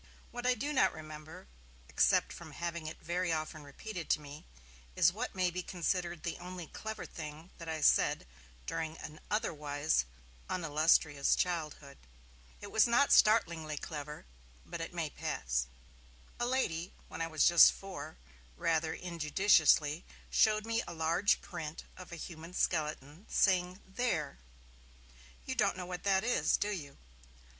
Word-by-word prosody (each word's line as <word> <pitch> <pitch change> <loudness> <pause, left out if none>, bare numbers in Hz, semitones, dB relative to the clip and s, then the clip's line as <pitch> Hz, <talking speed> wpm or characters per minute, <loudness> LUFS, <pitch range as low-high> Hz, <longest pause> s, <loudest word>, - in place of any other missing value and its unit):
What 245 +1 -3
I 250 - +4
do 290 +4 -2
not 265 - +4
remember, 155 - -10 0.4
except - - +3
from - - -10
having 170 -2 -4
it 155 - -7
very 175 +1 -1
often 155 0 -3
repeated 165 +5 -7
to - - +3
me, 145 +1 -11 0.5
is - - +5
what - - -4
may 185 -1 +1
be 180 +1 -3
considered 175 -1 -2
the 170 - -3
only 180 -1 -7
'clever' 220 +7 -6
thing 155 +2 -8
that 165 -1 -7
I 160 -1 -3
said - - +4 0.4
during 160 - -3
an 155 0 -9
otherwise 150 - 0 0.4
unillustrious 155 -3 +3
childhood. 155 -5 -2 0.6
It - - -8
was 220 - +5
not 245 +4 +4
startlingly 165 -8 +4
'clever', 150 - -6 0.4
but - - -6
it - - -4
may - - -3
pass. 60 0 -2 0.7
A 240 - +1
lady 185 -10 -1
when - - -7
I 165 - 0
was 155 -1 +3
just 170 -1 +9
four 195 - -8 0.4
rather 160 -1 +1
injudiciously 165 -2 +3 0.3
showed 215 0 +4
me 230 0 0
a 170 - -6
large 165 +5 +2
print 155 0 -6
of 185 -1 -11
a - - -5
human 165 +1 -8
skeleton, 155 +1 -1
saying, 185 -1 +2
'There! 190 - -2 1.1
you - - -2
don't - - +1
know 180 - -4
what 180 -1 -5
that 195 -1 +3
is, 245 +2 +2
do 210 - -1
you?' 145 -8 -6
165 Hz, 150 wpm, -33 LUFS, 155-185 Hz, 1.1 s, just